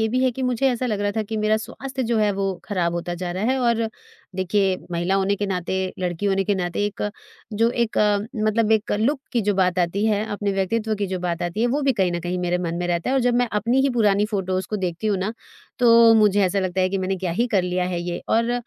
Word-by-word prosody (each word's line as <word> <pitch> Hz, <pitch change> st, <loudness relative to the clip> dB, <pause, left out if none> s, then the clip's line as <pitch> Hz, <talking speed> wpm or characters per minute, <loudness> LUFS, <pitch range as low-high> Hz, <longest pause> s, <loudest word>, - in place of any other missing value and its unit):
ये 220 Hz, -, +2 dB
भी 255 Hz, +3 st, 0 dB
है 255 Hz, -, +3 dB
कि 265 Hz, -, -5 dB
मुझे 250 Hz, +1 st, +1 dB
ऐसा 250 Hz, +1 st, -2 dB
लग 210 Hz, -4 st, -1 dB
रहा 205 Hz, 0 st, 0 dB
था 220 Hz, -, +1 dB
कि 220 Hz, +1 st, -5 dB
मेरा 215 Hz, 0 st, +2 dB
स्वास्थ्य 265 Hz, +4 st, -5 dB
जो 235 Hz, -2 st, 0 dB
है, 210 Hz, -1 st, +3 dB
वो 195 Hz, -1 st, -1 dB
खराब 175 Hz, -4 st, -1 dB
होता 175 Hz, 0 st, -3 dB
जा 175 Hz, 0 st, -4 dB
रहा 185 Hz, +3 st, -3 dB
है 265 Hz, -, 0 dB
और 230 Hz, -2 st, +1 dB, 0.5 s
देखिए, 190 Hz, 0 st, +1 dB, 0.2 s
महिला 175 Hz, +3 st, 0 dB
होने 195 Hz, +1 st, +1 dB
के 205 Hz, 0 st, -2 dB
नाते, 185 Hz, 0 st, -2 dB
लड़की 180 Hz, +2 st, -2 dB
होने 195 Hz, 0 st, +1 dB
के 205 Hz, +1 st, +1 dB
नाते 180 Hz, +2 st, -1 dB
एक 205 Hz, -, -5 dB, 0.5 s
जो 230 Hz, +3 st, +2 dB
एक 235 Hz, -2 st, -1 dB, 0.5 s
मतलब 220 Hz, 0 st, +2 dB
एक 220 Hz, 0 st, +1 dB
लुक 270 Hz, +5 st, +1 dB
की 235 Hz, -, +2 dB
जो 205 Hz, 0 st, +1 dB
बात 185 Hz, -1 st, +1 dB
आती 180 Hz, +4 st, 0 dB
है, 210 Hz, 0 st, +1 dB
अपने 205 Hz, -1 st, -2 dB
व्यक्तित्व 215 Hz, +3 st, 0 dB
की 200 Hz, -1 st, -1 dB
जो 185 Hz, -1 st, -3 dB
बात 175 Hz, -2 st, -2 dB
आती 175 Hz, +5 st, -3 dB
है, -, -, +3 dB
वो 280 Hz, +4 st, 0 dB
भी 270 Hz, -1 st, +3 dB
कहीं 190 Hz, -5 st, +1 dB
न 175 Hz, -, -2 dB
कहीं 180 Hz, +1 st, -3 dB
मेरे 180 Hz, 0 st, 0 dB
मन 170 Hz, -2 st, -3 dB
में 175 Hz, -, -1 dB
रहता 170 Hz, +7 st, -1 dB
है -, -, +1 dB
और 265 Hz, -, +3 dB
जब 245 Hz, 0 st, +2 dB
मैं 245 Hz, -1 st, +2 dB
अपनी 230 Hz, +5 st, +2 dB
ही 275 Hz, -, +2 dB
पुरानी 210 Hz, -3 st, +2 dB
फ़ोटोस 190 Hz, -2 st, -1 dB
को 210 Hz, -, -1 dB
देखती 180 Hz, +2 st, -3 dB
हूँ 200 Hz, -3 st, +1 dB
ना, 200 Hz, +4 st, -2 dB, 0.5 s
तो 230 Hz, -2 st, +7 dB
मुझे 210 Hz, -2 st, +4 dB
ऐसा 185 Hz, +2 st, 0 dB
लगता 185 Hz, 0 st, -1 dB
है 185 Hz, -, +3 dB
कि 195 Hz, -, -1 dB
मैंने 190 Hz, +1 st, -1 dB
क्या 185 Hz, -1 st, -3 dB
ही 235 Hz, +7 st, +1 dB
कर 195 Hz, -5 st, +2 dB
लिया 180 Hz, 0 st, -1 dB
है 180 Hz, -1 st, -2 dB
ये 175 Hz, 0 st, -4 dB
और 230 Hz, +1 st, +2 dB
205 Hz, 265 wpm, -23 LUFS, 185-225 Hz, 0.5 s, तो